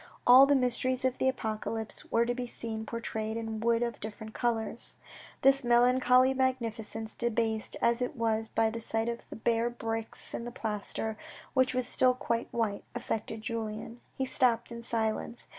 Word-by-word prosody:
All 255 Hz, +3 st, +9 dB
the 285 Hz, -, +5 dB
mysteries 255 Hz, 0 st, +1 dB
of 260 Hz, -1 st, 0 dB
the 265 Hz, -, +3 dB
Apocalypse 220 Hz, -2 st, -4 dB
were 230 Hz, +1 st, +3 dB
to 245 Hz, -, 0 dB
be 245 Hz, 0 st, -4 dB
seen 220 Hz, -2 st, -5 dB
portrayed 220 Hz, -1 st, -3 dB
in 225 Hz, -1 st, -4 dB
wood 230 Hz, +1 st, +2 dB
of 235 Hz, -2 st, -3 dB
different 220 Hz, +1 st, -7 dB
colours. 235 Hz, -1 st, -1 dB, 0.5 s
This 275 Hz, 0 st, +6 dB
melancholy 250 Hz, +2 st, +5 dB
magnificence, 230 Hz, -4 st, -2 dB
debased 225 Hz, -2 st, -1 dB
as 235 Hz, +1 st, +3 dB
it 250 Hz, +3 st, -2 dB
was 225 Hz, -2 st, 0 dB
by 225 Hz, 0 st, +1 dB
the 230 Hz, +1 st, -5 dB
sight 225 Hz, 0 st, -1 dB
of 235 Hz, 0 st, -6 dB
the -, -, -7 dB
bare 230 Hz, +1 st, +1 dB
bricks 225 Hz, -1 st, -5 dB
and 235 Hz, -, -4 dB
the -, -, -5 dB
plaster 220 Hz, 0 st, -3 dB, 0.4 s
(which 260 Hz, -1 st, +3 dB
was 255 Hz, -1 st, +1 dB
still 255 Hz, 0 st, +3 dB
quite 235 Hz, -2 st, -1 dB
white) 220 Hz, -4 st, -1 dB
affected 225 Hz, -2 st, -3 dB
Julien. 225 Hz, 0 st, -4 dB, 0.2 s
He 265 Hz, -, 0 dB
stopped 240 Hz, -3 st, +2 dB
in 235 Hz, 0 st, -6 dB
silence. 230 Hz, 0 st, -2 dB
235 Hz, 170 wpm, -30 LUFS, 220-250 Hz, 0.5 s, All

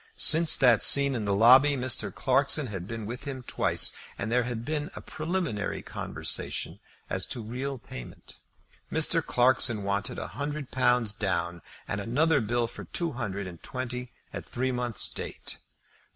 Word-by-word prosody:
Since 165 Hz, 0 st, +7 dB
that 125 Hz, -5 st, +5 dB
scene 140 Hz, -1 st, +5 dB
in 115 Hz, -4 st, -2 dB
the 100 Hz, -1 st, +1 dB
lobby 130 Hz, +7 st, +6 dB
Mr. 125 Hz, -1 st, 0 dB
Clarkson 140 Hz, +2 st, +2 dB
had 95 Hz, -6 st, -6 dB
been 115 Hz, -1 st, -6 dB
with 120 Hz, +6 st, -7 dB
him 135 Hz, -3 st, -6 dB
twice, -, -, +1 dB, 0.3 s
and 110 Hz, +3 st, -4 dB
there 125 Hz, 0 st, +2 dB
had 120 Hz, -1 st, -5 dB
been 150 Hz, +2 st, -3 dB
a -, -, -6 dB
preliminary 155 Hz, -, -3 dB
conversation -, -, -4 dB, 0.3 s
as -, -, -2 dB
to 120 Hz, -, -5 dB
real 130 Hz, +5 st, -4 dB
payment. 60 Hz, -, -11 dB, 0.5 s
Mr. -, -, +3 dB
Clarkson 120 Hz, -3 st, +3 dB
wanted 100 Hz, 0 st, -2 dB
a -, -, -5 dB
hundred 145 Hz, -1 st, -5 dB
pounds 125 Hz, -4 st, +2 dB
down, 85 Hz, -4 st, -2 dB, 0.3 s
and 100 Hz, -, -3 dB
another 145 Hz, +8 st, +2 dB
bill 120 Hz, +2 st, 0 dB
for 115 Hz, -, -8 dB
two 170 Hz, -2 st, -2 dB
hundred 100 Hz, -6 st, -4 dB
and 90 Hz, -2 st, -10 dB
twenty 125 Hz, -1 st, -5 dB, 0.2 s
at -, -, -5 dB
three 130 Hz, +2 st, -2 dB
months' 120 Hz, -3 st, 0 dB
date. -, -, -7 dB
125 Hz, 160 wpm, -27 LUFS, 105-135 Hz, 0.5 s, Since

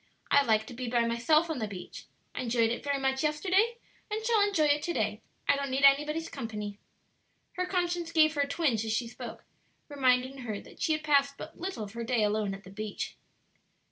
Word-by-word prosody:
"I 285 Hz, -, +7 dB
like 220 Hz, -4 st, +2 dB
to 245 Hz, -, -9 dB
be 250 Hz, 0 st, -4 dB
by 235 Hz, -1 st, +2 dB
myself 305 Hz, +8 st, +3 dB
on 320 Hz, -5 st, -3 dB
the 215 Hz, -, -2 dB
beach; 190 Hz, -3 st, -9 dB, 0.3 s
I -, -, -3 dB
enjoyed 230 Hz, -2 st, +2 dB
it 240 Hz, -, -3 dB
very 285 Hz, -1 st, 0 dB
much 265 Hz, 0 st, 0 dB
yesterday, 375 Hz, +10 st, +2 dB, 0.3 s
and 435 Hz, +1 st, -3 dB
shall 455 Hz, -2 st, +4 dB
enjoy 405 Hz, -6 st, +3 dB
it 295 Hz, 0 st, +3 dB
to 345 Hz, -, -2 dB
day; 215 Hz, -3 st, -1 dB, 0.3 s
I 285 Hz, -, +5 dB
don't 280 Hz, 0 st, -2 dB
need 265 Hz, +1 st, -1 dB
anybody's 300 Hz, +4 st, +4 dB
company." 210 Hz, -5 st, -6 dB, 0.7 s
Her 365 Hz, 0 st, -2 dB
conscience 350 Hz, -2 st, -1 dB
gave 310 Hz, -2 st, +5 dB
her 290 Hz, -, 0 dB
a 280 Hz, -, +1 dB
twinge 280 Hz, -8 st, +1 dB
as 220 Hz, -1 st, -1 dB
she 235 Hz, +1 st, 0 dB
spoke, 230 Hz, -, -9 dB, 0.4 s
reminding 260 Hz, -1 st, +2 dB
her 220 Hz, -5 st, -4 dB
that -, -, -15 dB
she 315 Hz, -, +2 dB
had 310 Hz, 0 st, -2 dB
passed 280 Hz, -2 st, +3 dB
but -, -, -9 dB
little 365 Hz, -, -4 dB
of 200 Hz, 0 st, -8 dB
her 235 Hz, 0 st, -4 dB
day 230 Hz, -2 st, +1 dB
alone 210 Hz, -1 st, 0 dB
on 195 Hz, -, -11 dB
the 190 Hz, -, -12 dB
beach. 210 Hz, +1 st, -5 dB
275 Hz, 215 wpm, -30 LUFS, 225-310 Hz, 0.7 s, I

